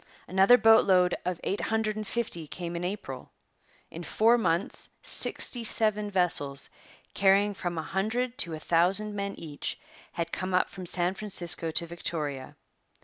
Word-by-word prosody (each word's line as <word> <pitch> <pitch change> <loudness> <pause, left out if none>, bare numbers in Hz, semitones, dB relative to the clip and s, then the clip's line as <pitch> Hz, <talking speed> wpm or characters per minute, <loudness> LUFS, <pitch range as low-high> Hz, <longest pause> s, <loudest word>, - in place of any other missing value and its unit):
Another 195 +6 +5
boat 225 -2 +5
load 180 -2 +4
of 180 -2 -2
eight 200 - -2
hundred 220 -1 -1
and 215 -1 -5
fifty 185 -10 -3
came 170 +2 -6
in 170 - -4
April. 180 -9 -6 0.6
In 165 - -8
four 225 +6 +3
months 195 -6 -1
sixty 240 -2 +2
seven 215 -2 +1
vessels, 165 -7 0 0.4
carrying 200 +1 +3
from 175 -3 -4
a 160 - -2
hundred 235 +8 -2
to 165 -2 +1
a - - -8
thousand 185 +7 +2
men 200 0 -4
each, 150 -3 -6 0.3
had 170 0 -4
come 185 0 -2
up 180 - +1
from 185 -2 -7
San 175 +1 +1
Francisco 180 -5 0
to 165 +1 +2
Victoria. 150 -5 -4
185 Hz, 155 wpm, -28 LUFS, 170-210 Hz, 0.6 s, Another